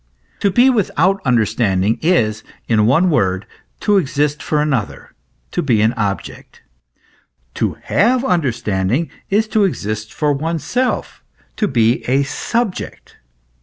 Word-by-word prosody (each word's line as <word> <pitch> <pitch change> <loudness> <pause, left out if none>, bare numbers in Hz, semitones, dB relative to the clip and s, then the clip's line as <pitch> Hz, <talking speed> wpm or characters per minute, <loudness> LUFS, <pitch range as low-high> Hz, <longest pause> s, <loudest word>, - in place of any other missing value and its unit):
To 200 - +2
be 245 +7 +4
without 195 - +2
understanding 110 -3 +1
is, 110 -11 +1 0.2
in 110 -2 +3
one 165 +8 +3
word, 95 -8 +1 0.4
to 205 -1 +3
exist 145 -1 -1
for 150 - 0
another, 140 -8 -2 0.4
to - - -1
be 120 -7 +2
an 110 +2 +2
object: 105 -5 -5 0.9
to - - -2
have 245 +5 +2
understanding 120 - 0 0.2
is 215 +3 +2
to 215 -1 +2
exist 110 - -2
for 150 -1 0
oneself, 165 - -2 0.3
to 210 - +1
be 115 -2 +2
a 135 +3 +2
subject. 220 - -4
140 Hz, 125 wpm, -18 LUFS, 110-185 Hz, 0.9 s, be